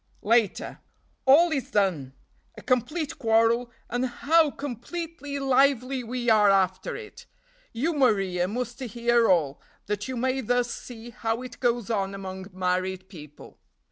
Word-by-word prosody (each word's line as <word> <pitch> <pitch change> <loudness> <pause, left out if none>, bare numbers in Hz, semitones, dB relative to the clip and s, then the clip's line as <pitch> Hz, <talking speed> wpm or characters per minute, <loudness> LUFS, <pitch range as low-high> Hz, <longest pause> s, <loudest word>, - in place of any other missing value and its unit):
"Later. 225 -1 +1 0.5
All 325 +6 +6
is 275 -4 -2
done! 175 -10 0 0.4
A - - -10
complete 280 +5 -1
quarrel, 230 +1 +2 0.2
and 245 +2 -1
how 310 +6 +3
completely 290 +3 -6
lively 270 -1 +2
we 245 +1 -4
are 215 -3 +5
after 190 -1 +1
it! 430 -1 -11 0.4
You, 290 +9 -1
Maria, 195 - +2
must 240 +4 -4
hear 235 -1 +1
all, 155 -7 +2 0.2
that 210 +2 -3
you 260 -1 -4
may 260 +2 0
thus 245 0 0
see 240 -1 -10
how 225 +1 -3
it 250 -1 -10
goes 240 -2 0
on 195 -2 -1
among 190 -1 -7
married 185 0 -2
people. 150 -5 -13
235 Hz, 140 wpm, -26 LUFS, 195-260 Hz, 0.5 s, All